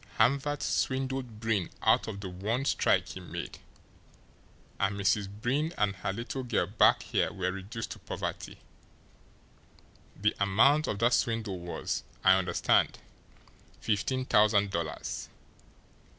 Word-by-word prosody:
"Hamvert 140 +2 +2
swindled 130 -4 -1
Breen 110 -6 0
out - - +4
of 100 -3 -6
the 95 - -5
one 105 +9 -2
strike - - +2
he - - -7
made, - - -7 1.2
and 100 0 +1
Mrs. 100 0 +1
Breen 130 - -1
and 100 -2 +1
her 95 - -2
little 120 +6 -4
girl 120 -3 0
back - - +4
here - - 0
were 95 -2 -2
reduced 100 +5 -6
to - - -7
poverty. - - -5 1.6
The 105 +2 +2
amount 115 +10 +4
of 105 - -1
that 120 +3 +3
swindle 110 -5 0
was, 85 0 -3 0.2
I 95 - +7
understand, 90 -2 +2 0.8
fifteen 130 +5 -1
thousand 105 -3 +4
dollars. 85 -3 -4
105 Hz, 125 wpm, -30 LUFS, 95-125 Hz, 1.6 s, I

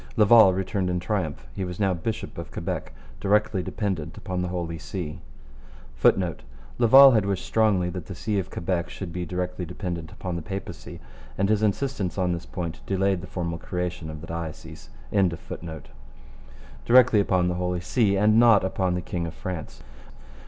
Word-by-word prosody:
Laval 110 -2 +7
returned 95 0 -1
in 90 0 0
triumph. 90 -6 -3
He 95 - -3
was 90 -2 -5
now 95 -2 +2
bishop 95 +6 -4
of - - -7
Quebec, - - -4 0.3
directly 105 -1 +2
dependent 90 -4 -3
upon 90 -3 -3
the 90 - -1
Holy 85 -2 -4
See 85 -5 -5 0.8
[Footnote: 85 +7 +2 0.4
Laval 135 +3 +9
had 110 -5 +2
wished 100 -2 -2
strongly 105 -5 +2
that 90 -1 -7
the 95 - -7
see 105 +3 -1
of 95 0 -4
Quebec 85 0 -2
should 90 -4 -7
be 90 -1 -4
directly 90 +1 -3
dependent 85 -2 -5
on 90 -2 -3
the - - -4
Papacy, 95 +1 -7 0.4
and 100 +1 +1
his 105 -1 +2
insistence 105 -3 -1
on 90 -2 +1
this 85 0 -4
point 85 -3 -5
delayed 95 -1 +1
the 95 - -8
formal 85 -2 -4
creation 90 -2 -4
of 75 -1 -7
the - - -8
diocese.] 80 -7 -7 0.2
and 95 -5 +2 0.2
not 80 -2 -7 2.8
upon 95 -1 0
the 90 - -2
king 85 -2 -3
of 80 - -6
France. 90 -4 -6
90 Hz, 155 wpm, -25 LUFS, 85-100 Hz, 2.8 s, Laval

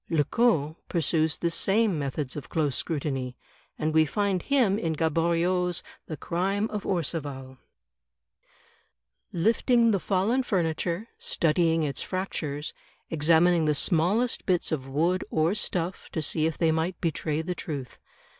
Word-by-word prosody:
Lecoq 160 - +2
pursues 160 -2 +1
the 170 - -1
same 195 +1 +2
methods 140 -1 -3
of 145 - -7
close 150 -5 0
scrutiny, 135 -5 -2 0.4
and 155 0 -1
we 160 0 +6
find 195 +3 0
him 235 -8 +2
in 165 -6 -1
Gaboriau's 170 +3 +1 0.2
"The 155 - -5
Crime 195 +8 -1
of 210 -2 -4
Orcival/' 140 -6 -3 0.9
".... - - -36
lifting 230 +5 +3
the 200 - +1
fallen 200 +8 +1
furniture, 175 -1 -1
studing 165 0 +2
its 140 -3 -2
fractures, 155 -6 -3 0.4
examining 165 +2 +4
the 150 -1 +2
smallest 190 - +1
bits 180 -3 +1
of 135 -4 -3
wood 170 +7 +1
or 160 +3 +2
stuff 185 -4 -2
to 160 - -1
see 155 +1 +1
if 160 - -3
they 165 -2 +3
might 165 +3 -1
betray 160 -2 -1
the 180 +2 -2
truth. 140 -8 -6
165 Hz, 135 wpm, -27 LUFS, 155-185 Hz, 0.9 s, we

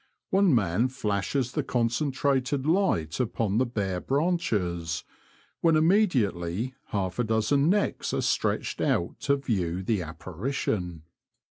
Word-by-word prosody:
One 190 -6 +4
man 105 +2 +2
flashes 125 +1 -1
the - - -1
concen 125 +4 0
trated 135 0 0
light 155 - +1
upon 115 -3 0
the 130 - +2
bare 100 -6 -2
branches, 105 - -1 0.6
when 165 -1 +4
immediately 130 - +2
half 95 0 -2
a - - +3
dozen 115 +7 +2
necks 205 +2 0
are - - 0
stretched - - 0
out 85 - 0
to 140 - +2
view 95 -10 -2
the 105 -1 0
apparition. 90 - -3
115 Hz, 125 wpm, -27 LUFS, 95-140 Hz, 0.6 s, One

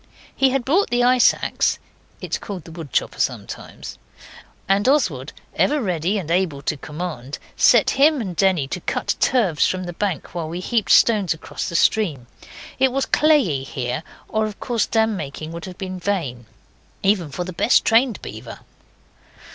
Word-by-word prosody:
He 270 - +4
had 260 -2 -1
brought 350 +9 +2
the 245 0 +2
ice 250 0 +6
axe - - -1 0.4
(it - - -7
is - - +1
called 195 -6 -7
the 165 - -12
wood 160 -5 -9
chopper - - -1
sometimes), - - -4 0.7
and 200 +5 +3
Oswald, 155 - +1 0.2
ever 300 +1 +2
ready 185 - -1
and 170 -5 -4
able 170 -6 0
to 150 - -1
command, 150 -3 -6 0.2
set - - +5
him 290 +2 +4
and 190 -7 -4
Denny 180 -7 +2
to 180 - -3
cut - - -1
turfs 200 - +2
from 185 0 -2
the 175 -1 -6
bank 190 -3 -3
while 165 -3 -4
we 170 +2 -4
heaped 220 +3 -1
stones 205 -7 +4
across 160 - -6
the 170 - -6
stream. 165 - +2 0.5
It 265 0 +4
was 270 +1 0
clayey 275 - +3
here, 125 0 -4 0.3
or 220 0 0
of 210 - -9
course 235 -3 -1
dam 220 -1 +1
making 155 -1 -6
would 170 0 -7
have 185 -1 -9
been 185 -1 -5
vain, 155 - -3 0.6
even 195 -5 +2
for 180 +6 -4
the 185 +1 -7
best - - +3
trained 230 +1 +3
beaver. - - -9
185 Hz, 175 wpm, -21 LUFS, 160-230 Hz, 0.7 s, ice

